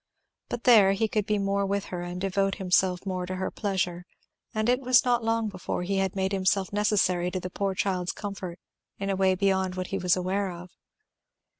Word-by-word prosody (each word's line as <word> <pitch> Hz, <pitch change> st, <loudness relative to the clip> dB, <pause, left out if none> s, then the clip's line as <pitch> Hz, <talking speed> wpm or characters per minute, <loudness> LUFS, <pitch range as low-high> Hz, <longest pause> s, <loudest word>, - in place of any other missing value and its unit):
But 240 Hz, -, -4 dB
there 210 Hz, -6 st, +7 dB
he 220 Hz, +3 st, +1 dB
could 210 Hz, -1 st, -1 dB
be 210 Hz, -, +1 dB
more 200 Hz, 0 st, 0 dB
with 200 Hz, 0 st, -1 dB
her 175 Hz, -, -3 dB
and 175 Hz, +1 st, -5 dB
devote 195 Hz, +1 st, 0 dB
himself 185 Hz, 0 st, +1 dB
more 185 Hz, -2 st, -3 dB
to 185 Hz, -, -3 dB
her 190 Hz, 0 st, -3 dB
pleasure; 180 Hz, -3 st, -2 dB, 0.4 s
and 215 Hz, -1 st, -1 dB
it 250 Hz, +2 st, +2 dB
was 255 Hz, 0 st, +4 dB
not 240 Hz, -1 st, +2 dB
long 225 Hz, 0 st, +1 dB
before 185 Hz, -2 st, -4 dB
he 195 Hz, +2 st, -1 dB
had 190 Hz, -1 st, 0 dB
made 190 Hz, 0 st, 0 dB
himself 195 Hz, 0 st, 0 dB
necessary 195 Hz, -4 st, +2 dB
to 185 Hz, -, -3 dB
the 180 Hz, 0 st, -6 dB
poor 195 Hz, 0 st, -2 dB
child's 180 Hz, -1 st, -1 dB
comfort 195 Hz, -4 st, -6 dB, 0.4 s
in 195 Hz, 0 st, -2 dB
a -, -, 0 dB
way 190 Hz, 0 st, +3 dB
beyond 190 Hz, -1 st, +1 dB
what 185 Hz, 0 st, -3 dB
he 195 Hz, -, 0 dB
was 180 Hz, -1 st, +3 dB
aware 190 Hz, +2 st, -1 dB
of. 175 Hz, +1 st, -10 dB
195 Hz, 205 wpm, -27 LUFS, 185-200 Hz, 0.4 s, there